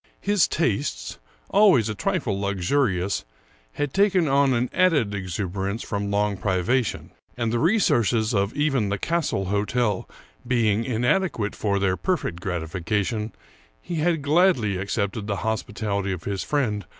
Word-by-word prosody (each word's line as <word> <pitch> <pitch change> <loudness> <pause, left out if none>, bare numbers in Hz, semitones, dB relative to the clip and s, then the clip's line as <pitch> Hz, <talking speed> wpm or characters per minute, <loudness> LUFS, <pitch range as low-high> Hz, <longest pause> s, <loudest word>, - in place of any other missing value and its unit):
His 205 -6 +2
tastes, - - -2 0.3
always 190 - +5
a 110 - -2
trifle 130 - -1
luxurious, 100 0 0 0.5
had 145 -2 -2
taken 195 -4 +3
on 140 0 +3
an 120 +1 +1
added 150 - +3
exuberance 95 +2 -3
from 100 -2 -3
long 100 0 0
privation; 100 +6 0 0.3
and 115 -2 -1
the 120 - +1
re 175 - +3
sources 115 - +2
of 100 0 +1
even 135 -8 +1
the 100 - -1
Castle 160 - -1
Hotel 105 +2 0 0.4
being 115 -3 +2
inadequate 125 - 0
for 100 -2 0
their 95 -2 +1
perfect 175 - -2
gratification, 95 +5 -2 0.5
he 170 - -5
had 160 -1 +1
gladly 145 - +3
accepted 100 +2 -2
the 100 - -1
hospitality 105 -2 -2
of 90 -3 -5
his 100 -2 -3
friend. 110 - -1
110 Hz, 140 wpm, -24 LUFS, 100-140 Hz, 0.5 s, always